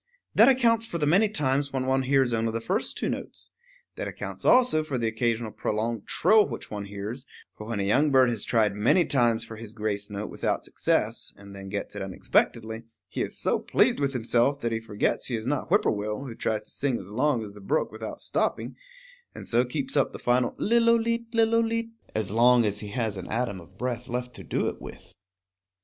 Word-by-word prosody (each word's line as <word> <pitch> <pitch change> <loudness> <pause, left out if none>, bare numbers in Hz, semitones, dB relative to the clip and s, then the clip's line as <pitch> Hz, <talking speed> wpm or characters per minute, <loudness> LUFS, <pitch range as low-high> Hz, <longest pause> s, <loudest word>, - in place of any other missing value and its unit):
That - - +7
accounts 230 -3 +3
for 170 - -3
the 150 - 0
many 195 +8 +4
times 140 -6 0
when 130 -1 -2
one 135 0 +2
hears 130 -2 +2
only 115 0 0
the 115 - -2
first 190 - -2
two - - -1
notes. - - -5 0.5
That - - -3
accounts - - -7
also 245 -11 +5
for 145 -4 -3
the 115 -2 0
occasional 115 0 -1
prolonged 110 +1 -2
trill 215 -1 +4
which 115 - -7
one 105 -1 -4
hears; 105 +6 -6 0.3
for 105 - -9
when 115 -3 -3
a - - 0
young 135 +10 +3
bird 130 -3 +5
has 110 -4 -3
tried 110 -4 +2
many 115 - +3
times 120 -5 +2
for 110 - -9
his 110 -1 -9
grace 105 -2 -3
note 105 +1 -5
without - - -1
success, - - -1
and 100 0 -12
then 95 0 -8
gets 100 +1 -5
it 105 - -5
unexpectedly, 110 +3 0 0.3
he - - -3
is - - -2
so - - +1
pleased - - +2
with 140 -1 0
himself 125 +3 +1
that 115 - -1
he 115 - -1
forgets 110 -2 -1
he 125 - -2
is 110 -1 -4
not 140 +1 -1
Whippoorwill, 105 - 0
who 125 - -6
tries 110 -1 -2
to - - -9
sing 135 -4 -1
as 100 -1 -10
long 130 +1 +1
as 105 - -8
the 105 - -13
brook 95 - 0
without 110 0 -7
stopping, - - -2 0.6
and - - -9
so 120 +1 +3
keeps 260 - -4
up - - +2
the - - -6
final 120 0 +1
lillooleet 230 0 +2
lillooleet 230 0 +1 0.2
as 110 -3 -1
long 120 +1 +5
as 105 0 0
he 105 - -6
has 105 -1 -2
an 95 - -7
atom 110 -5 -2
of 90 +3 -18
breath 125 0 -3
left 125 +1 -4
to - - -10
do - - -1
it - - -5
with. - - -11
120 Hz, 210 wpm, -26 LUFS, 110-145 Hz, 0.6 s, That